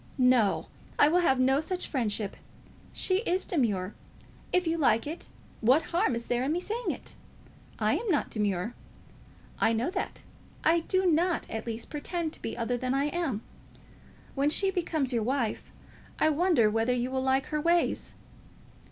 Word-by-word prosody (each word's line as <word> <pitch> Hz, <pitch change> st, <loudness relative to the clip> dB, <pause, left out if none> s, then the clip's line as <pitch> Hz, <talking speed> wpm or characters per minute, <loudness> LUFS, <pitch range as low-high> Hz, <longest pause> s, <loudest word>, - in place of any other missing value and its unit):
No; 250 Hz, -5 st, +3 dB, 0.3 s
I -, -, +6 dB
will 350 Hz, +3 st, +3 dB
have 265 Hz, -7 st, +3 dB
no 265 Hz, +2 st, +4 dB
such 360 Hz, +3 st, -1 dB
friendship! 215 Hz, -6 st, -1 dB, 0.6 s
She 370 Hz, -, +1 dB
is 375 Hz, -4 st, 0 dB
demure. 210 Hz, -, 0 dB, 0.6 s
If 360 Hz, 0 st, +2 dB
you 325 Hz, 0 st, +1 dB
like 230 Hz, -6 st, +3 dB
it, 315 Hz, +4 st, -5 dB, 0.3 s
what 260 Hz, +8 st, +4 dB
harm 340 Hz, -, +2 dB
is 235 Hz, 0 st, -4 dB
there 245 Hz, +1 st, 0 dB
in 285 Hz, +4 st, 0 dB
my -, -, 0 dB
saying 445 Hz, +6 st, -3 dB
it? -, -, -5 dB, 0.6 s
I -, -, +2 dB
am 465 Hz, -, -4 dB
not 305 Hz, -6 st, +1 dB
demure. 205 Hz, 0 st, -1 dB, 0.9 s
I 225 Hz, -, +3 dB
know 235 Hz, +9 st, 0 dB
that. 380 Hz, 0 st, -4 dB, 0.4 s
I 335 Hz, +1 st, +4 dB
do 375 Hz, +3 st, 0 dB
not, 345 Hz, +1 st, +2 dB
at 225 Hz, +1 st, -4 dB
least, 230 Hz, 0 st, -5 dB
pretend 320 Hz, +2 st, -3 dB
to -, -, -7 dB
be -, -, -4 dB
other 245 Hz, +1 st, -1 dB
than 255 Hz, +2 st, -1 dB
I 280 Hz, +2 st, +1 dB
am. 295 Hz, -12 st, -2 dB, 0.9 s
When 280 Hz, +1 st, +2 dB
she 385 Hz, +5 st, +3 dB
becomes 315 Hz, -7 st, -1 dB
your 235 Hz, -, +1 dB
wife, 240 Hz, -1 st, -2 dB, 0.5 s
I 310 Hz, -, +3 dB
wonder 310 Hz, -, +3 dB
whether 225 Hz, +3 st, +1 dB
you 250 Hz, +1 st, -1 dB
will 260 Hz, 0 st, 0 dB
like 265 Hz, +1 st, +2 dB
her 300 Hz, -, +1 dB
ways?" 340 Hz, +2 st, +1 dB
275 Hz, 170 wpm, -29 LUFS, 235-340 Hz, 0.9 s, I